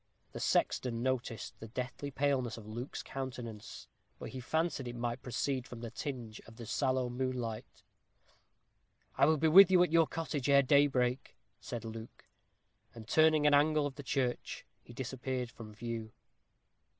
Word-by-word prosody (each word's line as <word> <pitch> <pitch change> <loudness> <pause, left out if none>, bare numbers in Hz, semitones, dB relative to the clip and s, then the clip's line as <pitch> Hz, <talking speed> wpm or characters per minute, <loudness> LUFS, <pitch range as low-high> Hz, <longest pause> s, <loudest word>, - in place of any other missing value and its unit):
The - - -7
sexton 120 -2 +1
noticed 130 -3 -2
the 115 - -8
deathly 125 +5 -5
paleness 135 -4 0
of 110 - -10
Luke's 120 +5 -6
countenance, 120 -5 -7 0.3
but - - -7
he 130 - -6
fancied 160 0 -1
it 120 - -5
might 120 0 -3
proceed 130 +1 -2
from 120 -2 -9
the 115 -2 -6
tinge 120 -7 -5
of 115 - -13
the 115 - -8
sallow 130 +1 0
moonlight. 125 -3 -4 1.3
"I 140 - +5
will 155 0 +4
be 160 +2 +2
with 190 +5 +9
you 180 -1 +6
at 180 - 0
your 165 -1 +5
cottage 150 -4 -3
ere 140 0 +6
daybreak," 130 -2 +2 0.2
said 120 -1 -6
Luke. 115 0 -9 0.7
And 110 -2 -10
turning 155 0 +4
an 145 - +5
angle 150 +1 +4
of 145 - -3
the 145 - -8
church, 130 -2 -2 0.2
he - - -14
disappeared 125 0 -4
from 115 -3 -10
view. 110 0 -5
130 Hz, 160 wpm, -33 LUFS, 120-145 Hz, 1.3 s, with